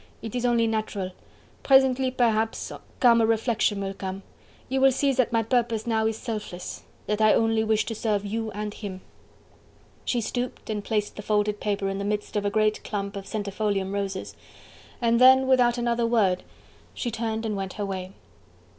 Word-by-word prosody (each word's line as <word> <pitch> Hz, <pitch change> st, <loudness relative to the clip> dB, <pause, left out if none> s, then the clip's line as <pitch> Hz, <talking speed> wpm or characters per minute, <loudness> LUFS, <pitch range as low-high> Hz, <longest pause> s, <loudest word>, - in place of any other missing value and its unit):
it 225 Hz, -, -6 dB
is 245 Hz, 0 st, 0 dB
only 235 Hz, -1 st, +3 dB
natural... 215 Hz, -4 st, -2 dB, 0.5 s
presently, 265 Hz, -1 st, +4 dB
perhaps, 225 Hz, -3 st, 0 dB, 0.3 s
calmer 235 Hz, -3 st, +6 dB
reflection 225 Hz, -2 st, +1 dB
will 195 Hz, 0 st, -3 dB
come... 190 Hz, 0 st, -6 dB, 0.4 s
you 265 Hz, +1 st, 0 dB
will 270 Hz, 0 st, +6 dB
see 275 Hz, +1 st, +1 dB
that 255 Hz, -3 st, +1 dB
my 230 Hz, -1 st, +2 dB
purpose 230 Hz, -1 st, 0 dB
now 220 Hz, -2 st, +1 dB
is 220 Hz, -1 st, -2 dB
selfless... 210 Hz, -7 st, -6 dB, 0.2 s
that 210 Hz, +1 st, -1 dB
I 215 Hz, 0 st, +6 dB
only 225 Hz, -1 st, +2 dB
wish 215 Hz, -1 st, +1 dB
to 230 Hz, -, -3 dB
serve 210 Hz, -2 st, -1 dB
you 225 Hz, +2 st, -2 dB
and 210 Hz, +1 st, -4 dB
him." 195 Hz, -4 st, -7 dB, 1.0 s
She 245 Hz, -, 0 dB
stooped 245 Hz, 0 st, -4 dB
and 210 Hz, -1 st, -3 dB
placed 210 Hz, -1 st, -2 dB
the -, -, -4 dB
folded 210 Hz, 0 st, 0 dB
paper 205 Hz, -1 st, -1 dB
in 195 Hz, 0 st, -2 dB
the -, -, -2 dB
midst 210 Hz, +1 st, -3 dB
of 205 Hz, -1 st, 0 dB
a -, -, +2 dB
great 215 Hz, +1 st, +1 dB
clump 200 Hz, -1 st, -4 dB
of 195 Hz, -1 st, -6 dB
centifolium 200 Hz, -2 st, -2 dB
roses, 200 Hz, -1 st, -3 dB, 0.6 s
and 235 Hz, 0 st, +2 dB
then 260 Hz, +1 st, +8 dB
without 250 Hz, -2 st, +4 dB
another 235 Hz, -1 st, +1 dB
word 200 Hz, -6 st, +2 dB, 0.5 s
she 240 Hz, -, -3 dB
turned 225 Hz, 0 st, -2 dB
and 215 Hz, -2 st, -1 dB
went 195 Hz, -1 st, -4 dB
her 205 Hz, -, -3 dB
way. 190 Hz, -1 st, -5 dB
220 Hz, 180 wpm, -26 LUFS, 205-235 Hz, 1.0 s, then